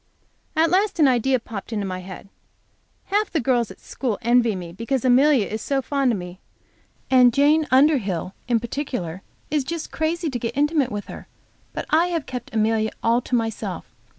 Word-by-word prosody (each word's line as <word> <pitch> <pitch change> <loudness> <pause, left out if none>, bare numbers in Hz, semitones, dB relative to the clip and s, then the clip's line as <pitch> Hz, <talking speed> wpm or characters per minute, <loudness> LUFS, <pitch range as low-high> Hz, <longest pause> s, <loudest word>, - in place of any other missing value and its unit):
At 320 +1 +3
last 390 +1 +2
an 300 - +6
idea 255 +1 +2
popped 225 -2 -8
into 205 -3 -2
my 185 -1 -4
head. 185 +1 -10 0.9
Half 420 +1 +2
the 325 - 0
girls 240 -3 +1
at - - -12
school 240 -6 -3
envy 235 -2 +3
me 175 -2 -7
because 230 +7 -2
Amelia 255 -1 +5
is 220 +2 -5
so 275 -1 0
fond 275 -1 0
of 220 - -1
me, 180 0 -8 0.7
and 250 -2 +6
Jane 295 +4 +3
Underhill, 250 - +2
in 240 -2 +2
particular, 230 - -4 0.3
is 300 -2 +1
just 330 +3 -5
crazy 320 0 -1
to 245 - -3
get 235 +2 -4
intimate 295 -3 +2
with 205 0 -4
her. - - -10 0.4
But - - -5
I 330 +3 +4
have 335 -4 -2
kept 250 -2 -7
Amelia 220 0 +1
all 230 +2 +3
to 250 - -2
myself. 225 -2 -3
250 Hz, 180 wpm, -23 LUFS, 220-290 Hz, 0.9 s, an